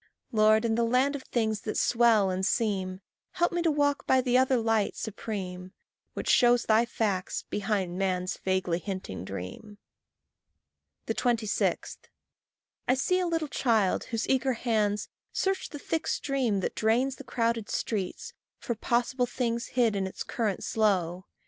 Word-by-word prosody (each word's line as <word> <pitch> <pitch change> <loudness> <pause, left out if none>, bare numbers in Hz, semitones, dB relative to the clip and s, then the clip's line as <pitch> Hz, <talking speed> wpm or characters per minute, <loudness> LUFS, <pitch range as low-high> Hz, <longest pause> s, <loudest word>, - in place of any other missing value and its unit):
Lord, 215 0 +4
in 225 - +1
the 235 +1 +2
land 255 +5 +2
of 280 - -5
things 220 -5 -1
that 215 - -3
swell 230 -5 +4
and 185 +1 -2
seem, 190 -3 0 0.3
Help 345 -1 +1
me 345 -1 -1
to 335 - +2
walk 290 -1 +1
by 260 - +5
the 250 -1 +1
other 260 0 +4
light 225 -2 +1
supreme, 190 -4 -5 0.4
Which - - -4
shows 240 -1 +5
thy 220 +2 +4
facts 200 -6 -2
behind 195 -3 -1
man's 185 -1 0
vaguely 185 -2 0
hinting 185 - -5
dream. 95 - -7 1.3
26. 230 -4 0 0.9
I 250 - +5
see 365 +8 +1
a 365 - 0
little 325 -2 -1
child 225 -8 +1
whose 230 -1 -3
eager 265 0 +2
hands 215 -3 0 0.3
Search 385 0 -1
the 295 - -7
thick 320 +3 -3
stream 255 -8 0
that - - -2
drains 245 +5 +1
the - - -9
crowded 230 -2 -1
street 200 -5 -3 0.2
For 235 - -3
possible 245 +2 0
things 235 -1 -2
hid 235 -4 +2
in 195 -1 -1
its 190 - -6
current 215 -5 -2
slow. 185 -4 0
225 Hz, 150 wpm, -28 LUFS, 195-250 Hz, 1.3 s, by